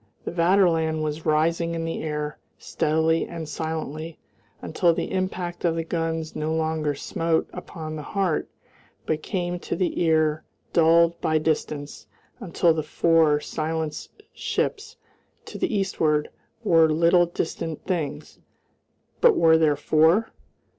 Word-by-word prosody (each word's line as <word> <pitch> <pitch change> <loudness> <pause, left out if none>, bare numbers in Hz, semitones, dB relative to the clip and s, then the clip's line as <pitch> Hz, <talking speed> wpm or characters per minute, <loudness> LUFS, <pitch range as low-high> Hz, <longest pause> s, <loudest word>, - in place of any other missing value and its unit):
The - - -3
Vaterland 165 -3 +2
was 155 +1 -4
rising 165 +2 +1
in 165 0 -3
the 165 - -3
air, 150 -1 -4 0.2
steadily 160 +1 0
and 165 -2 -6
silently, 160 0 -5 0.4
until 170 -2 +1
the - - -3
impact 185 -2 -3
of 170 -2 +2
the 165 - -1
guns 165 -1 -3
no 155 +1 -1
longer 160 -2 -1
smote 165 +3 -1
upon 155 -2 -7
the 155 - -5
heart 185 +1 -1 0.6
but 155 0 -1
came 175 -2 -3
to - - -4
the 185 -2 -1
ear 155 -2 +2 0.3
dulled 170 0 +4
by 155 0 +2
distance, 150 -6 -3 0.3
until 175 -5 +2
the 160 - -1
four 155 -1 +3
silenced 160 - -4
ships 425 +2 -2 0.5
to - - -8
the 365 - 0
eastward 155 -6 0 0.3
were 165 -6 +5
little 170 +3 +4
distant 165 -2 -4
things: 170 -6 -4 0.8
but 480 -4 +6
were 160 -1 +5
there 155 -2 +3
four? 160 +9 +3
160 Hz, 135 wpm, -24 LUFS, 155-170 Hz, 0.8 s, but